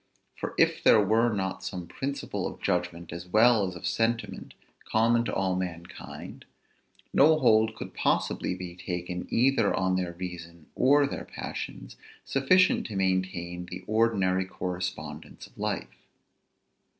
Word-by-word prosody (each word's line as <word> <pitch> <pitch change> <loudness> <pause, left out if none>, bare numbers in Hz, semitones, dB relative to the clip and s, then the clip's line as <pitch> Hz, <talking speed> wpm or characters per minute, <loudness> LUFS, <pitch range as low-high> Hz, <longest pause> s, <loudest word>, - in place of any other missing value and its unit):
For - - -5
if - - +3
there 110 - +7
were 110 +4 +3
not 95 -2 -3
some 90 -2 -5
principles 140 +10 -4
of - - -14
judgment 85 -1 -2
as 85 +1 -7
well 110 +1 +5
as 90 - -6
of 90 - -8
sentiment 115 +1 -1 0.4
common 115 +1 +3
to - - -3
all 95 -1 +1
mankind, 90 -2 -7 0.7
no 155 +2 +6
hold 110 -5 +4
could - - -8
possibly - - 0
be 90 -1 -7
taken 90 0 -5
either 125 -3 +3
on 95 0 +1
their 90 -2 -2
reason 85 -2 -8
or 140 +3 +4
their 140 - -5
passions, - - -7 0.3
sufficient 185 +8 +3
to 110 - -7
maintain 95 -2 -1
the 90 +1 -8
ordinary 100 -4 +2
correspondence 90 -4 -5
of - - -20
life. - - -4
95 Hz, 140 wpm, -28 LUFS, 90-115 Hz, 0.7 s, there